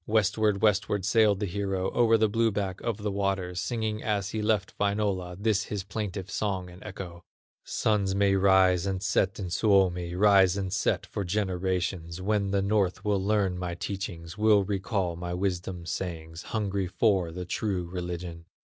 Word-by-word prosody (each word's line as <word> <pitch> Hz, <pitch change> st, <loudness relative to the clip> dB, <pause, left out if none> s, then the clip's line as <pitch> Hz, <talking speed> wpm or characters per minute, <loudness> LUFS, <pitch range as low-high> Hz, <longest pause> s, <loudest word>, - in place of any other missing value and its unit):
Westward, 105 Hz, -1 st, +2 dB
westward, 105 Hz, -2 st, +2 dB
sailed 105 Hz, -1 st, +4 dB
the 105 Hz, -, -1 dB
hero 95 Hz, 0 st, -2 dB
O'er 115 Hz, -2 st, +4 dB
the 110 Hz, 0 st, +3 dB
blue 115 Hz, +2 st, +2 dB
back 100 Hz, -2 st, -3 dB
of 115 Hz, -3 st, -2 dB
the 105 Hz, -1 st, -3 dB
waters, 95 Hz, -2 st, -1 dB
Singing 110 Hz, -3 st, -2 dB
as 105 Hz, -2 st, -1 dB
he 110 Hz, -, -2 dB
left 105 Hz, -3 st, 0 dB
Wainola, 100 Hz, -3 st, 0 dB
This 105 Hz, -1 st, +1 dB
his 100 Hz, -3 st, -4 dB
plaintive 100 Hz, -1 st, -5 dB
song 95 Hz, -3 st, -2 dB
and 90 Hz, +2 st, -13 dB
echo: 85 Hz, -2 st, -8 dB, 0.4 s
"Suns 100 Hz, -3 st, 0 dB
may 100 Hz, 0 st, +3 dB
rise 95 Hz, -1 st, +4 dB
and 95 Hz, 0 st, -2 dB
set 95 Hz, -2 st, +1 dB
in 95 Hz, -4 st, -5 dB
Suomi, 90 Hz, -4 st, +2 dB
Rise 95 Hz, -1 st, +5 dB
and 95 Hz, -2 st, -3 dB
set 95 Hz, -, 0 dB
for 100 Hz, -, -4 dB
generations, 90 Hz, -3 st, -2 dB
When 100 Hz, +1 st, 0 dB
the 100 Hz, 0 st, +1 dB
North 100 Hz, -2 st, 0 dB
will 100 Hz, -2 st, +1 dB
learn 100 Hz, -3 st, +1 dB
my 90 Hz, -1 st, -3 dB
teachings, 90 Hz, -1 st, -5 dB
Will 105 Hz, -2 st, +5 dB
recall 95 Hz, -2 st, -1 dB
my 90 Hz, +1 st, -4 dB
wisdom 90 Hz, -2 st, -3 dB
sayings, 80 Hz, -2 st, -5 dB
Hungry 100 Hz, -3 st, -1 dB
for 95 Hz, -2 st, +2 dB
the 90 Hz, +2 st, -6 dB
true 95 Hz, -1 st, -2 dB
religion. 85 Hz, -1 st, -5 dB
95 Hz, 165 wpm, -28 LUFS, 90-105 Hz, 0.4 s, Rise